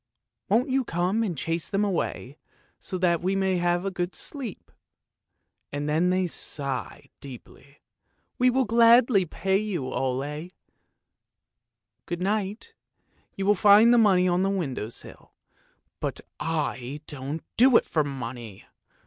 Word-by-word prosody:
Won't 240 +7 +2
you 265 0 +2
come 180 +2 0
and 190 -8 -2
chase 165 +3 -3
them 200 +1 +1
away 160 -7 -3 0.4
so 185 - -5
that 175 -2 +1
we 190 +2 0
may 190 -1 +1
have 175 +1 0
a 195 - -1
good 175 0 -3
sleep? 260 -9 -7 0.5
' - - -54
and 145 +1 -3
then 160 +4 +2
they 185 0 +1
sigh 140 - -4
deeply. 140 +1 -13 0.2
' - - -47
We 250 +1 +5
will 260 +1 +2
gladly 230 -3 +5
pay 190 +4 0
you, 200 -10 -3
Ole; 145 +6 -3 1.6
good 175 -1 -3
night. 210 - -2 0.6
You 195 - -3
will 205 - +5
find 210 +4 +6
the 240 - +5
money 190 -4 +4
on 180 0 +2
the 195 - +1
window 145 - -3
sill.' - - -11 0.7
But - - -3 0.2
I 145 -4 -3
don't 145 +2 -6
do 250 0 +6
it - - 0
for 155 - 0
money! 120 -7 -7
180 Hz, 145 wpm, -26 LUFS, 145-205 Hz, 1.6 s, find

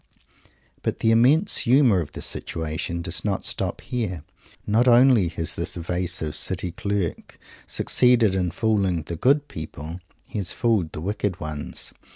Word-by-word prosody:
But - - -2
the 110 - +2
immense 135 - +4
humour 125 -5 +4
of 75 -4 -5
the - - -6
situation 80 +1 -4
does 85 -1 -2
not 100 -3 -2
stop - - -1
here. 100 -10 -4 0.4
Not 115 +4 +2
only 120 -5 +6
has 80 -1 -2
this - - -2
evasive 85 -2 -2
City 90 -1 0
Clerk 100 -1 -3 0.3
succeeded 120 -5 +3
in 90 -2 0
fooling 95 -3 0
the 85 - -6
"good 140 - +2
people;" 80 +2 -7 0.3
he 105 - -4
has 95 -3 -3
fooled 110 -9 0
the 75 - -6
"wicked 100 0 -2
ones." 75 -1 -5
95 Hz, 150 wpm, -24 LUFS, 85-115 Hz, 0.4 s, only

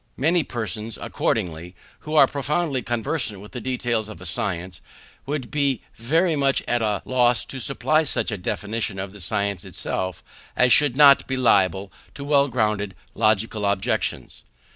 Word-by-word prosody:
Many 165 +4 +2
persons, 110 -2 -4
accordingly, 85 +1 -2 0.2
who 155 +1 -5
are 145 -3 +8
profoundly 140 0 -1
conversant 120 -2 -2
with 105 +2 -12
the 125 - -6
details 120 -3 -1
of 110 - -10
a - - -10
science, 90 -2 -3 0.5
would 140 -4 -3
be 140 -4 0
very 160 +8 +1
much 140 -2 +1
at 120 -1 +1
a 105 -3 -1
loss 125 -3 +2
to 135 - -6
supply 145 +5 +1
such 145 -5 -1
a 105 - -3
definition 105 +2 -3
of 95 0 -5
the 100 -1 -11
science 100 -1 -2
itself 95 -2 -4 0.3
as 125 -1 +5
should 145 -2 +5
not 140 -1 +6
be 130 - -2
liable 100 -5 +2 0.2
to 140 - -7
well 140 -1 +3
grounded 105 -5 -1 0.2
logical 110 0 +1
objections. 100 -1 -1
115 Hz, 160 wpm, -23 LUFS, 100-140 Hz, 0.5 s, are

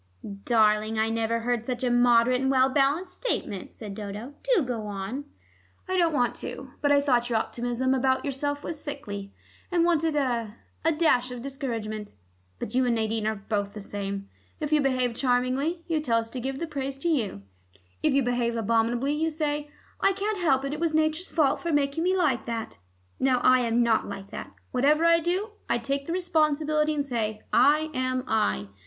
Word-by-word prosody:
"Darling, 215 -1 +3
I 220 +1 +1
never 230 0 0
heard 235 -1 -1
such 250 -1 -3
a 250 - +2
moderate 245 +1 +4
and 265 - +1
well 260 0 +4
balanced 290 +7 +1
statement," 205 - -3
said 210 -3 -7
Dodo. 210 +5 -6
"Do - - +2
go 235 -4 -3
on." 205 +8 -4 0.6
"I 370 - -1
don't 340 -3 +3
want 245 -5 +1
to. 265 -1 -7
But 285 - +2
I 285 - +6
thought 245 -4 +2
your 230 - +2
optimism 245 +3 -1
about 260 0 +1
yourself 285 +1 -2
was 305 -2 -5
sickly, 205 -9 -5 0.4
and 345 -1 +3
wanted 325 -2 +2
a 235 -6 -1 0.3
a 325 - +4
dash 300 -6 +2
of 245 -1 -7
discouragement. 225 - -5 0.4
But 205 - -5
you 260 +1 +3
and 235 - +2
Nadine 220 -1 0
are 220 - 0
both 205 0 -3
the - - -5
same: 200 -1 -5 0.3
if 300 -1 -3
you 300 - +5
behave 255 -3 +1
charmingly, 255 +7 0
you 325 -2 +1
tell 235 -6 +2
us 225 0 -2
to 255 - -4
give 265 +2 -3
the 335 - -3
praise 275 -3 -4
to 275 - -3
you; 225 - 0 0.6
if - - +3
you 275 0 +3
behave 240 -1 0
abominably 230 +4 +1
you 320 +2 0
say, 295 -1 -2 0.3
'I 390 - +3
can't 405 +1 -2
help 275 -5 +2
it: 275 - -2
it 300 - -4
was 325 -2 0
Nature's 315 +3 +1
fault 305 -5 +2
for 340 - -2
making 290 +1 +1
me 370 +2 +2
like 280 -11 +1
that.' 225 - -4 0.4
Now 260 -1 +3
I 255 0 +6
am 240 0 +2
not 230 -2 +2
like 195 0 -8
that: - - -7 0.2
whatever 295 +6 +3
I 335 0 +6
do, 365 +6 -1 0.2
I - - +3
take 275 +4 -2
the - - -3
responsibility, 310 -3 +1
and 285 -1 -1
say, 220 -5 -2
'I 305 +4 +4
am 255 -1 -1
I. 210 - 0
260 Hz, 195 wpm, -27 LUFS, 230-300 Hz, 0.6 s, I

